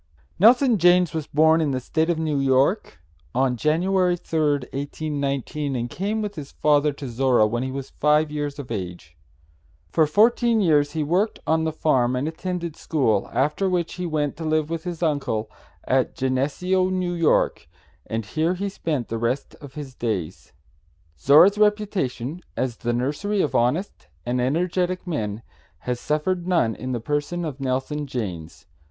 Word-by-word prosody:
Nelson 240 Hz, +2 st, +5 dB
Janes 175 Hz, 0 st, +4 dB
was 155 Hz, -2 st, -3 dB
born 160 Hz, +2 st, +4 dB
in 155 Hz, -, +1 dB
the 130 Hz, -2 st, -1 dB
State 160 Hz, +6 st, -1 dB
of 170 Hz, -, +1 dB
New 155 Hz, -3 st, -1 dB
York 135 Hz, -, +1 dB, 0.4 s
on 130 Hz, -1 st, +2 dB
January 180 Hz, +6 st, +1 dB
3rd, 150 Hz, -5 st, 0 dB
1819, 140 Hz, 0 st, -3 dB
and 120 Hz, -1 st, -3 dB
came 210 Hz, +4 st, -2 dB
with 205 Hz, -1 st, -4 dB
his 150 Hz, -6 st, -8 dB
father 150 Hz, 0 st, +3 dB
to 140 Hz, -1 st, -7 dB
Zorra 125 Hz, -2 st, +3 dB
when 120 Hz, +3 st, -1 dB
he 130 Hz, -, -2 dB
was 135 Hz, 0 st, -6 dB
five 150 Hz, +1 st, +2 dB
years 145 Hz, -1 st, -3 dB
of 140 Hz, -5 st, -8 dB
age. 90 Hz, -6 st, -6 dB, 0.8 s
For 160 Hz, -2 st, +3 dB
fourteen 230 Hz, +6 st, +3 dB
years 150 Hz, -6 st, +3 dB
he 155 Hz, -2 st, -1 dB
worked 185 Hz, +8 st, +1 dB
on 160 Hz, 0 st, +1 dB
the 160 Hz, -, 0 dB
farm 130 Hz, -6 st, +1 dB
and 130 Hz, +4 st, -1 dB
attended 170 Hz, 0 st, -4 dB
school, 115 Hz, -14 st, 0 dB
after 150 Hz, +10 st, +1 dB
which 175 Hz, -2 st, -1 dB
he 180 Hz, -1 st, -4 dB
went 150 Hz, -3 st, -1 dB
to 165 Hz, -, -6 dB
live 155 Hz, 0 st, 0 dB
with 165 Hz, 0 st, -4 dB
his 175 Hz, -1 st, -4 dB
uncle 140 Hz, -8 st, -1 dB, 0.3 s
at -, -, +1 dB
Geneseo, 150 Hz, +9 st, 0 dB
N.Y., 175 Hz, -3 st, +2 dB, 0.6 s
and 110 Hz, -1 st, -3 dB
here 160 Hz, -, 0 dB
he 200 Hz, +2 st, -3 dB
spent 150 Hz, -, -3 dB
the 115 Hz, -, -3 dB
rest 120 Hz, +4 st, -2 dB
of 140 Hz, -2 st, -11 dB
his 145 Hz, -3 st, -7 dB
days. 110 Hz, -10 st, -4 dB, 0.7 s
Zorra's 170 Hz, -, +6 dB
reputation 185 Hz, -, 0 dB, 0.2 s
as 125 Hz, -2 st, -2 dB
the 120 Hz, -, -2 dB
nursery 145 Hz, -, -1 dB
of 150 Hz, -, -2 dB
honest 125 Hz, -, 0 dB, 0.2 s
and 125 Hz, +1 st, 0 dB
energetic 180 Hz, +6 st, 0 dB
men 110 Hz, -, -3 dB, 0.4 s
has 125 Hz, -1 st, -3 dB
suffered 170 Hz, +6 st, -1 dB
none 165 Hz, -11 st, +2 dB
in 130 Hz, +3 st, -6 dB
the 120 Hz, -, -1 dB
person 145 Hz, +7 st, -2 dB
of 145 Hz, -3 st, -5 dB
Nelson 135 Hz, +3 st, -2 dB
Janes. 90 Hz, -11 st, -6 dB
150 Hz, 165 wpm, -23 LUFS, 130-175 Hz, 0.8 s, Zorra's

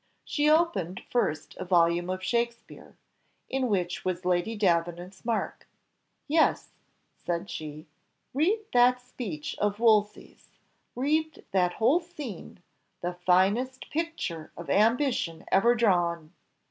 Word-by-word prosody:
She 295 Hz, 0 st, +1 dB
opened 305 Hz, -, +1 dB
first 195 Hz, -10 st, -1 dB
a -, -, -4 dB
volume 175 Hz, -1 st, +2 dB
of 185 Hz, 0 st, -3 dB
Shakspeare, 235 Hz, +3 st, -3 dB, 0.5 s
in 265 Hz, -1 st, -1 dB
which 180 Hz, -5 st, -1 dB
was 185 Hz, 0 st, -3 dB
Lady 180 Hz, +5 st, +1 dB
Davenant's 175 Hz, -1 st, -1 dB
mark. 230 Hz, -1 st, -2 dB, 0.6 s
"Yes," 315 Hz, +2 st, +2 dB, 0.5 s
said 175 Hz, +3 st, -3 dB
she, 155 Hz, 0 st, -7 dB, 0.5 s
"read 355 Hz, -, +2 dB
that 250 Hz, +1 st, +5 dB
speech 235 Hz, -, -6 dB
of 205 Hz, 0 st, 0 dB
Wolsey's; 215 Hz, -3 st, +1 dB, 0.4 s
read 310 Hz, +5 st, -1 dB
that 180 Hz, -2 st, +2 dB
whole 265 Hz, +10 st, +3 dB
scene, 295 Hz, -, -9 dB, 0.4 s
the 175 Hz, +1 st, -2 dB
finest 195 Hz, +9 st, +1 dB
picture 305 Hz, -, -3 dB
of 170 Hz, -, -5 dB
ambition 225 Hz, -, +1 dB
ever 235 Hz, +5 st, +5 dB
drawn." 175 Hz, -7 st, +1 dB
205 Hz, 115 wpm, -28 LUFS, 175-250 Hz, 0.6 s, that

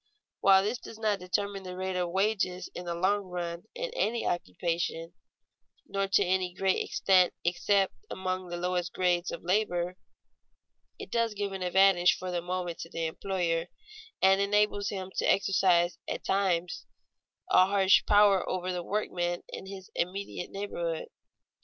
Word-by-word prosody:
While 195 Hz, -1 st, +6 dB
this 225 Hz, +4 st, -2 dB
does 225 Hz, -, -11 dB
not 215 Hz, -3 st, 0 dB
determine 195 Hz, +2 st, -2 dB
the 180 Hz, -1 st, -8 dB
rate 190 Hz, 0 st, -3 dB
of 180 Hz, -1 st, -1 dB
wages 190 Hz, -1 st, 0 dB
in 180 Hz, -, -7 dB
the 170 Hz, -1 st, -3 dB
long 195 Hz, +3 st, +1 dB
run 175 Hz, -1 st, -5 dB
in -, -, -4 dB
any 235 Hz, -, 0 dB
occupation 165 Hz, -, -2 dB, 0.7 s
nor 195 Hz, 0 st, -1 dB
to 195 Hz, +1 st, +3 dB
any 185 Hz, 0 st, 0 dB
great 190 Hz, 0 st, +1 dB
extent 185 Hz, -2 st, +3 dB
except 195 Hz, +2 st, +2 dB, 0.2 s
among 185 Hz, 0 st, -3 dB
the 175 Hz, 0 st, -5 dB
lowest 180 Hz, 0 st, -2 dB
grades 180 Hz, -1 st, +1 dB
of -, -, -6 dB
labor, 180 Hz, -1 st, 0 dB, 1.0 s
it -, -, -9 dB
does 230 Hz, -2 st, 0 dB
give 200 Hz, -1 st, -2 dB
an 190 Hz, -1 st, -6 dB
advantage 180 Hz, 0 st, +4 dB
for 185 Hz, 0 st, -5 dB
the 175 Hz, -1 st, -1 dB
moment 180 Hz, -1 st, -4 dB
to 165 Hz, -, -7 dB
the 165 Hz, -2 st, -3 dB
employer, 170 Hz, 0 st, -1 dB, 0.6 s
and 195 Hz, +1 st, +5 dB
enables 205 Hz, 0 st, +2 dB
him 190 Hz, -2 st, -5 dB
to -, -, +3 dB
exercise 180 Hz, -3 st, +2 dB
at -, -, -4 dB
times 180 Hz, -3 st, 0 dB, 0.6 s
a 185 Hz, 0 st, +6 dB
harsh 195 Hz, -1 st, +4 dB
power 205 Hz, -3 st, +5 dB
over 185 Hz, 0 st, -2 dB
the 180 Hz, -, -2 dB
workmen 175 Hz, -3 st, -2 dB
in 190 Hz, -, -8 dB
his 190 Hz, -1 st, -9 dB
immediate 185 Hz, +1 st, -3 dB
neighborhood. 170 Hz, -5 st, -4 dB
185 Hz, 155 wpm, -29 LUFS, 175-195 Hz, 1.0 s, While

